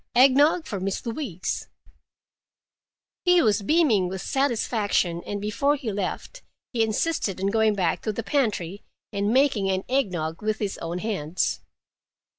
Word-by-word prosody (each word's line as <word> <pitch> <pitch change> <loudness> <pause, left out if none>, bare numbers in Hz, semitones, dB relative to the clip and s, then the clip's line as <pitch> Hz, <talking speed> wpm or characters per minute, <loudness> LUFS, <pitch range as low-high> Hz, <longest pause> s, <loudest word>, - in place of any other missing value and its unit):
Egg 260 +2 +7
nog 315 +4 +4
for 200 - -4
Miss 195 +4 -3
Louise." 230 - -3 1.6
He 360 -1 +5
was 210 -2 +3
beaming 230 - +3
with 190 0 -5
satisfaction, 220 -9 0
and 205 - -3
before 230 +8 +1
he 265 -6 -4
left, 205 - -4 0.3
he 235 - +1
insisted 220 - -1
on 195 +1 0
going 220 -1 +3
back 180 -4 0
to 215 - -1
the 225 +2 -4
pantry 205 - -1 0.3
and 200 +1 0
making 255 -7 +3
an 190 0 0
egg 260 -6 +1
nog 160 -2 -4
with 215 0 -1
his 205 -3 -3
own 170 +2 -4
hands. 180 -5 -1
215 Hz, 150 wpm, -25 LUFS, 190-265 Hz, 1.6 s, Egg